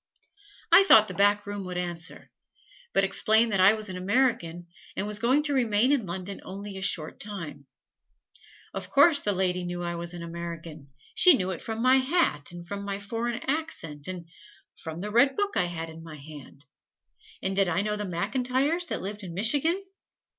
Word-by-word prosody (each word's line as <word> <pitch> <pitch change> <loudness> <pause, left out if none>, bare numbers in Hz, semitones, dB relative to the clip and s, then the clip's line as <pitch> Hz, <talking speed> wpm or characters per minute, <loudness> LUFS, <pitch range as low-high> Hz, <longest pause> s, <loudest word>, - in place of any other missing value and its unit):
I 390 - +9
thought 220 - +7
the 185 - -6
back 205 +2 +3
room 205 -1 -5
would 180 -1 -5
answer; 175 -2 -5 0.6
but - - +2
explained 220 +3 +3
that 195 - 0
I 190 +3 +7
was 215 -1 -4
an 185 -1 -6
American 185 -4 0 0.3
and 200 - -2
was 210 0 -2
going 255 +6 +3
to 295 -1 -1
remain 240 -1 +2
in 255 -9 +1
London 185 +3 -6
only 200 +1 -7
a 190 - -6
short 170 -5 -1
time. 170 -9 -6 1.1
Of - - -6
course 285 +1 +5
the 205 - 0
lady 180 -1 0
knew 175 0 -4
I 175 0 -2
was 170 +1 -5
an 170 - -7
American: 165 -3 -7 0.2
she 360 -3 +7
knew 190 -5 -2
it 180 - -5
from 225 +1 -4
my 255 +1 +6
hat 260 - +1
and 175 0 -10
from 200 +2 -5
my 200 0 -3
foreign 230 +3 -3
accent 265 - -3
and 180 -2 -6 0.5
from 160 0 -7
the 205 +4 -5
red 265 +5 +4
book 405 0 -1
I 180 - +2
had 165 -2 -5
in 160 0 -11
my 160 -2 -10
hand. 145 -1 -12 0.8
And 190 0 -1
did 195 -1 +3
I 175 +4 0
know 210 0 -1
the 210 - -3
McIntyres 260 - 0
that - - -4
lived 205 +2 -5
in 170 -3 -7
Michigan? 295 - +2
195 Hz, 190 wpm, -27 LUFS, 175-235 Hz, 1.1 s, I